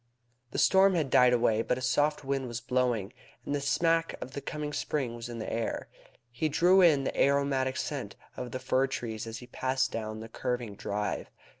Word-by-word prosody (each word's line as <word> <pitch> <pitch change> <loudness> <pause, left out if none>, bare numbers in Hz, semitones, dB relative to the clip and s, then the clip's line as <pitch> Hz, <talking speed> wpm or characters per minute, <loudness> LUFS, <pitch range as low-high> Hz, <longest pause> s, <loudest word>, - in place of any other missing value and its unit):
The - - -6
storm 190 0 +5
had 150 -6 0
died 125 0 +6
away, 115 -2 +3
but 125 - 0
a - - -5
soft 145 +3 +1
wind 135 -1 -1
was 120 -1 -4
blowing, 120 -4 0 0.3
and - - -2
the 145 - -1
smack 165 +3 +1
of 130 - -7
the 140 - -5
coming 150 0 -4
spring 135 -7 -2
was 120 0 -7
in 120 - -6
the 110 - -4
air. 115 0 -3 0.4
He 155 +6 -1
drew 180 +5 +5
in 155 -6 +5
the - - -2
aromatic 140 -2 +2
scent - - -4 0.2
of 125 - -5
the 130 - -4
fir 130 +1 +1
trees 115 -4 -4
as 115 +1 -5
he 125 - -10
passed 130 +1 -1
down 110 -1 -4
the 110 - -7
curving 120 -1 -3
drive. 105 +1 -3
130 Hz, 200 wpm, -29 LUFS, 120-140 Hz, 0.4 s, died